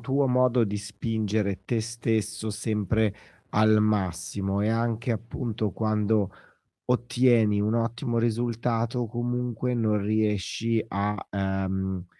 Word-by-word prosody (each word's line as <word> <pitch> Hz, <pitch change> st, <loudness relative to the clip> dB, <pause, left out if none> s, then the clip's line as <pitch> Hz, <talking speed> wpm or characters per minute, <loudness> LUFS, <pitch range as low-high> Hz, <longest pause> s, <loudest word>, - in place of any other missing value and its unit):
tuo 135 Hz, +3 st, +1 dB
modo 125 Hz, -1 st, +3 dB
di 105 Hz, -1 st, -1 dB
spingere 105 Hz, -1 st, -2 dB
te 115 Hz, -2 st, 0 dB
stesso 110 Hz, -1 st, -2 dB
sempre 105 Hz, 0 st, 0 dB, 0.4 s
al 110 Hz, 0 st, +4 dB
massimo, 95 Hz, -1 st, 0 dB
e 105 Hz, -, +1 dB
anche 115 Hz, +1 st, 0 dB
appunto, 115 Hz, -2 st, -2 dB
quando 105 Hz, -2 st, +1 dB, 0.6 s
ottieni 120 Hz, -4 st, +3 dB
un 105 Hz, +2 st, +1 dB
ottimo 115 Hz, 0 st, 0 dB
risultato, 115 Hz, +1 st, 0 dB
comunque 120 Hz, +1 st, -2 dB
non 110 Hz, -3 st, +1 dB
riesci 110 Hz, +2 st, 0 dB
a, 100 Hz, +1 st, -1 dB, 0.2 s
ehm, 95 Hz, -1 st, -2 dB
110 Hz, 110 wpm, -27 LUFS, 105-120 Hz, 0.6 s, al